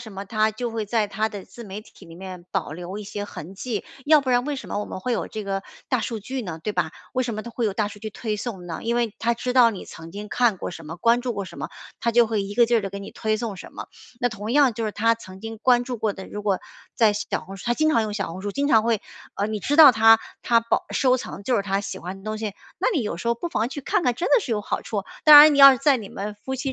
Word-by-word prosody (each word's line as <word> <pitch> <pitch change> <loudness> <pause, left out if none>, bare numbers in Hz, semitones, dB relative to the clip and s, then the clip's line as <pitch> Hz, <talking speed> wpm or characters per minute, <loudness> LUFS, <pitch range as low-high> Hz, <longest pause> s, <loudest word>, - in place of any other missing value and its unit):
什 220 -4 -10
么， 195 +1 -6
她 215 +1 +1
就 235 +2 -4
会 225 -1 -3
在 220 -1 +1
她 215 +2 -1
的 205 -3 -8
自 235 - -12
媒 205 0 -7
体 200 - -17
里 165 - -13
面 185 -2 -9
保 180 -6 -2
留 180 +4 -6
一 210 - -7
些 205 +1 -5
痕 190 -1 -9
迹， 220 +1 -4 0.2
要 305 0 +6
不 260 -2 -2
然 245 +1 +3
为 290 -1 -2
什 - - -8
么 - - -2
我 - - -3
们 - - -7
会 245 +5 -2
有 - - -2
这 215 -2 -6
个 195 0 -2 0.3
大 255 - +1
数 225 0 -3
据 255 +4 -5
呢， 165 -5 -6
对 210 - -2
吧？ 170 -4 0 0.2
为 255 - +1
什 235 -3 -3
么 215 - -4
它 235 - -8
会 235 0 -2
有 210 - +1
大 210 +1 0
数 205 - -11
据 215 0 -5
推 215 0 -3
送 195 -5 -6
呢？ 165 - -5
因 235 +1 -1
为 235 -3 0
它 235 +1 +1
知 250 +2 -3
道 245 -3 +6
你 200 - -7
曾 165 0 -11
经 205 +2 -7
看 235 -4 +2
过 - - -5
什 165 -2 -10
么 165 +3 -7
关 235 +6 +3
注 245 -1 -2
过 200 -2 -4
什 - - -11
么， - - -4 0.3
它 235 - +1
就 240 0 +5
会 220 -2 -1
一 200 +1 -6
个 235 -1 +5
劲 235 - +3
儿 - - -1
地 195 -1 -5
给 200 - -6
你 200 - -8
推 215 -1 -1
送 215 -3 -4
什 - - -11
么。 - - -7 0.3
那 245 - +2
同 215 +1 -5
样 275 -5 +4
就 225 - -3
是 215 - -1
她 230 +2 +2
曾 190 -4 -12
经 225 0 -7
关 245 0 +3
注 250 -1 -4
过 215 -1 -1
的， 190 - -9
如 210 - -6
果， 200 -2 +1 0.4
在 220 -4 +4
小 210 - -3
红 195 +1 -9
书 - - -11
她 240 - +3
经 310 +3 +2
常 230 -6 +3
用 215 -1 -3
小 195 -4 -2
红 185 +2 -8
书 205 - -3
经 285 +1 0
常 220 -5 +5
会 230 -2 +1 0.4
呃， 205 - 0
你 215 -1 -3
知 290 - 0
道 300 -5 +10
她 225 0 +6 0.2
她 230 -1 +4
保 230 - 0
收 255 -1 +3
藏 200 - -7
就 245 +2 +1
是 200 - +1
她 195 0 -1
喜 195 -2 -6
欢 185 +3 -7
的 195 - -16
东 215 0 -3
西， 215 -2 -4 0.3
那 - - +2
你 275 - +1
有 205 -5 -3
时 235 - -4
候 235 - +3
不 340 +9 -5
妨 230 -5 -1
去 285 +2 -6
看 340 - 0
看 245 - +1
真 340 - -2
的 - - +5
是 275 - -6
有 210 - 0
好 - - -3
处。 205 -3 -3 0.2
当 300 -1 +11
然 300 -1 +8
你 - - 0
要 275 -1 +11
是 255 - -2
在 275 -1 +4
你 210 -4 -8
们 205 +1 -5
夫 260 +6 -6
妻 265 +1 -3
220 Hz, 340 characters per minute, -24 LUFS, 200-240 Hz, 0.4 s, 当